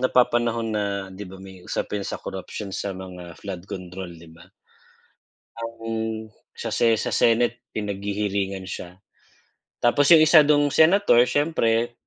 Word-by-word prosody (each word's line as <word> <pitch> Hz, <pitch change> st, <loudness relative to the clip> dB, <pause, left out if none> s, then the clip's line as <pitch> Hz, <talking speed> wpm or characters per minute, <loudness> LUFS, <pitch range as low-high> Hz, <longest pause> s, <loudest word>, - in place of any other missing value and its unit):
napapanahon 120 Hz, -2 st, +2 dB
na 105 Hz, -1 st, 0 dB, 0.3 s
'di 100 Hz, +2 st, -8 dB
ba 95 Hz, -, -10 dB
may 95 Hz, -1 st, -12 dB
usapin 100 Hz, -1 st, -3 dB
sa -, -, -5 dB
corruption 95 Hz, +1 st, -6 dB
sa 100 Hz, -, -3 dB
mga 90 Hz, -2 st, -10 dB
flood 95 Hz, -3 st, -6 dB
control 90 Hz, -1 st, -7 dB
di 80 Hz, 0 st, -15 dB
ba? 85 Hz, -, -16 dB, 1.1 s
Ang 115 Hz, 0 st, -7 dB, 0.8 s
sa -, -, -5 dB
Se 115 Hz, -1 st, +3 dB
sa -, -, -2 dB
Senate 120 Hz, +1 st, +2 dB
pinaghihiringan 100 Hz, -2 st, -3 dB
siya, 90 Hz, +1 st, -8 dB, 0.9 s
tapos 140 Hz, +4 st, +4 dB
yung 160 Hz, -, +9 dB
isa 155 Hz, 0 st, +8 dB
dung 145 Hz, -1 st, +4 dB
Senator 160 Hz, -7 st, +5 dB
siyempre, 120 Hz, -6 st, +1 dB
105 Hz, 135 wpm, -24 LUFS, 95-120 Hz, 1.1 s, yung